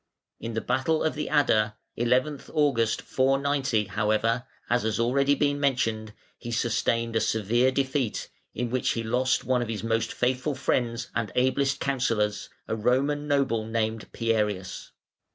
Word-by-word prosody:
In 115 0 -5
the 115 - 0
battle 155 +4 0
of 160 - +1
the 150 0 -4
Adda, 110 -8 +2 0.2
11 130 +5 +1
August, 135 -8 +2
490, 135 -3 +1
however, 110 +4 0 0.2
as 120 0 +2
has 110 -1 -1
been 115 - +2
already 140 +3 +2
mentioned, 115 -6 0 0.3
he 120 - -6
sustained 115 0 0
a 110 - +3
severe 115 +4 +2
defeat, 130 -3 -1 0.2
in 120 0 -2
which 130 0 +1
he 115 - -3
lost 125 +3 +1
one 130 -1 +1
of 120 - -2
his 110 -1 -4
most 115 0 0
faithful 130 +3 0
friends 120 -3 -1
and 110 -4 -2
ablest 135 +2 +1
counsellors, 115 -6 0 0.2
a - - -1
Roman 140 +6 +1
noble 135 -6 +1
named 110 -1 -2
Pierius. 105 -5 -1
120 Hz, 150 wpm, -26 LUFS, 110-135 Hz, 0.3 s, a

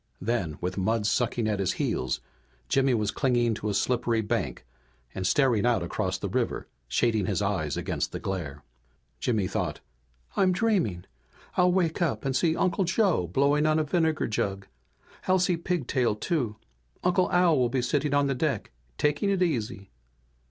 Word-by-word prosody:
Then, 95 -9 -1
with 90 +2 -2
mud 110 +2 +1
sucking 120 0 +1
at 105 -2 0
his 95 - +1
heels, - - -1 0.5
Jimmy 135 - +3
was 105 -2 0
clinging 120 -4 +1
to 105 0 -3
a - - -1
slippery 120 +1 +1
bank 105 - -2 0.5
and 95 -1 -2
staring 125 -6 +3
out 120 -7 +2
across 85 - -2
the - - -4
river, - - -2 0.2
shading 105 - +1
his - - 0
eyes 95 -8 -1
against - - -2
the - - -4
glare. 75 -7 -4 0.6
Jimmy 110 -6 0
thought, - - -2 0.6
"I'm 185 -2 +3
dreaming! 180 - 0 0.5
I'll 180 0 +4
wake 175 -2 +1
up 165 -5 0
and 135 -1 0
see 160 +3 +2
Uncle 190 +2 +1
Joe 180 - +2
blowing 140 - +2
on 155 0 +3
a 155 - +2
vinegar 160 0 +1
jug. 100 -2 -2 0.6
I'll 185 - +4
see 180 -1 +2
Pigtail, 140 -9 0
too. 120 -3 -1 0.5
Uncle 180 +1 +2
Al 175 -5 +4
will 125 -1 +2
be 125 0 0
sitting 145 +2 0
on 145 0 +3
the 140 - +1
deck, 125 - -2 0.3
taking 150 +7 +1
it 195 -2 +2
easy!" 115 - -2
125 Hz, 165 wpm, -27 LUFS, 105-165 Hz, 0.6 s, I'll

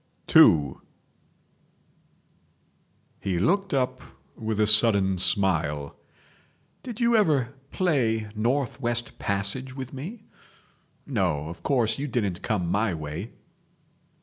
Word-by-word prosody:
II 70 -4 +6 2.4
He 95 -3 -2
looked 195 - +1
up 130 -2 -1 0.3
with 110 -1 -3
a 105 - +4
sudden 100 -3 +4
smile. 85 -6 +1 0.9
"Did 240 -3 -8
you 235 -1 +3
ever 145 - +2 0.2
play 120 - 0
North 125 +4 -1
West 120 -1 -2
Passage 100 +7 -1
with 130 -1 -7
me?..... 185 - -8 0.8
No, 90 - -1
of 85 - -9
course 125 -3 +1
you 145 - -3
didn't 105 -8 -2
come 105 -6 -1
my 100 +1 0
way!" 80 +8 -6
110 Hz, 105 wpm, -25 LUFS, 95-135 Hz, 2.4 s, II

